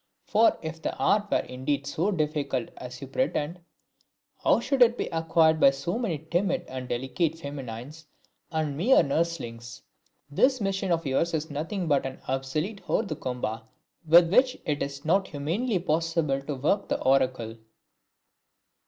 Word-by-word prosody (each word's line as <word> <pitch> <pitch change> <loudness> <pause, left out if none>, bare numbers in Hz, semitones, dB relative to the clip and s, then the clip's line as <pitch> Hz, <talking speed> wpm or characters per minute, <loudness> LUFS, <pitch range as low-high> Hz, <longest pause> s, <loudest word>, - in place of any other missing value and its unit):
For 220 +2 +4
if 160 0 -6
the - - -3
art 210 0 +2
were - - +2
indeed 135 +2 -2
so 160 +7 -1
difficult 150 - -1
as 125 0 -8
you 135 - -6
pretend, 170 - -1 0.8
how - - +4
should 275 -2 -1
it 240 0 +6
be - - -1
acquired 160 -1 +3
by 140 - +7
so 170 +10 -3
many 200 -10 -1
timid 180 +2 +1
and 130 -1 -6
delicate 135 +7 -1
feminines 140 0 -8 0.4
and 155 -3 -1
mere 220 - +5
nurselings? 135 -7 -3 0.4
This 255 - +2
machine 195 -2 -1
of 165 -1 +1
yours 160 +5 +1
is 160 0 -3
nothing 165 +5 -3
but 140 -3 +2
an 130 - -8
obsolete 145 +10 -2
hors 225 - +1
de 155 - -4
combat 125 -5 -4 0.4
with 170 +2 +6
which 255 +2 +4
it 150 -2 -1
is 140 +2 -4
not 190 +4 +2
humanly 180 - -1
possible 165 -4 0
to 140 +1 -4
work 150 +10 0
the - - 0
oracle!" 130 -4 +1
155 Hz, 155 wpm, -27 LUFS, 135-175 Hz, 0.8 s, by